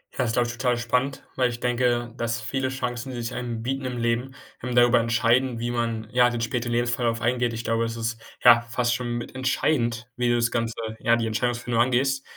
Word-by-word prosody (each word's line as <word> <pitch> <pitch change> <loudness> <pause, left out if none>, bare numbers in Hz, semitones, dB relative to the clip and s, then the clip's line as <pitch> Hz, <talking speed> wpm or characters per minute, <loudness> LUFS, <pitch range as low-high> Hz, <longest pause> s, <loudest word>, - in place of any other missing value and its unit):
Ja, - - -11
das 125 - +2
ist, - - -2
glaube 120 -1 +2
ich, 120 - -4
total 125 -1 +1
spannend, 125 +3 -1
weil 125 -1 +2
ich 120 - -6
denke, 120 -1 0
dass 115 -1 -1
viele 130 +4 -2
Chancen, 125 0 -4
die 120 - -5
sich 115 +1 -4
einem 120 -2 -4
bieten 135 +2 -2
im 125 -1 -3
Leben, 120 +3 -1 0.3
ähm, 125 0 -3
darüber 120 0 +6
entscheiden, 115 +2 +2
wie 120 +1 -2
man, 115 -2 -2
ja, 125 0 +4
den 120 -1 -3
späteren 120 +1 -2
Lebensverlauf 120 -1 0
eingeht. 120 +1 +1
Ich 115 0 -5
glaube, 115 0 0
das 115 0 -4
ist, 115 0 -3 0.2
ja, 120 -1 +8
fast 120 +1 -1
schon 120 -1 -2
mit 120 - -7
entscheidend, 125 -2 0
wie 125 0 0
du 120 - +3
das 120 0 +1
Ganze, 115 -1 -1 0.2
ja, 115 +1 +3
die 115 -1 -1
Entscheidungsfindung 120 +1 0
angehst. 135 +2 +1
120 Hz, 225 wpm, -25 LUFS, 115-125 Hz, 0.3 s, ja